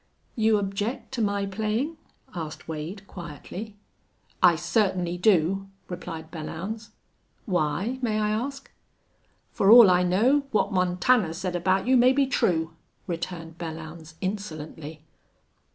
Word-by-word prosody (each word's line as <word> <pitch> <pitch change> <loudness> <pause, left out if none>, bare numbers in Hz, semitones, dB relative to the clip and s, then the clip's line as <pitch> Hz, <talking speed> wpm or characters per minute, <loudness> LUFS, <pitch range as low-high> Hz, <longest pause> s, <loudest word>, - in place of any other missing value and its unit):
"You 220 -1 +3
object 205 +6 -3
to 255 -3 -2
my 200 -1 0
playin'?" 220 +10 -2 0.4
asked 160 -4 -6
Wade, 165 +6 -6
quietly. 185 +5 -8 0.7
"I 175 -2 +7
certainly 175 0 0
do," 190 0 +2 0.2
replied 165 -3 -7
Belllounds. 185 +7 -6 0.6
"Why, 185 - -1
may 220 -3 0
I 210 0 +1
ask?" 275 +5 -4 0.8
"For 195 - +2
all 225 -4 +10
I 180 0 +4
know, 240 +11 +3
what 205 -4 +1
Montana 180 +1 +2
said 180 0 -3
about 185 +2 +1
you 260 +1 +4
may 250 +2 +6
be 275 0 +3
true," 165 -10 0 0.3
returned 170 -2 -5
Belllounds, 160 -1 -8
insolently. 160 -6 -5
190 Hz, 120 wpm, -26 LUFS, 170-215 Hz, 0.8 s, all